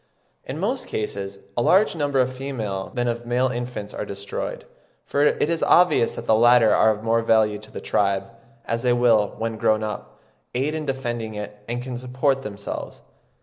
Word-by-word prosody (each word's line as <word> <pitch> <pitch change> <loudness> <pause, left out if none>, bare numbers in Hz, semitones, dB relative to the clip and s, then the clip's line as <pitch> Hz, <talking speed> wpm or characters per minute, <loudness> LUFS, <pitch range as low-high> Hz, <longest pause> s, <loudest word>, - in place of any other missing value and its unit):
In 135 - -6
most 230 +10 -2
cases 100 -2 -4 0.2
a 120 - +1
larger 190 - +4
number 145 -3 0
of 130 0 +2
female 110 -8 -4
than 120 -1 0
of 120 0 -3
male 125 +2 +2
infants 120 -4 -5
are - - -3
destroyed, 100 -1 -5 0.4
for 145 - +1
it 150 - +3
is 165 0 -1
obvious 170 -9 +4
that - - -6
the - - +3
latter 120 0 +6
are 110 - +5
of 110 0 -1
more 115 0 +2
value 110 -2 +3
to 110 +1 -14
the - - -7
tribe, 100 -1 +1 0.4
as 115 0 -1
they 125 -1 +3
will, 115 -4 +3
when 115 0 -3
grown 110 0 +2
up, 105 -1 -6 0.4
aid 140 +5 0
in 155 -1 -4
defending 120 -5 -3
it, 105 0 -7
and 120 +1 -3
can 125 -1 -5
support 130 +2 0
themselves. 100 -4 -6
120 Hz, 190 wpm, -23 LUFS, 110-130 Hz, 0.4 s, latter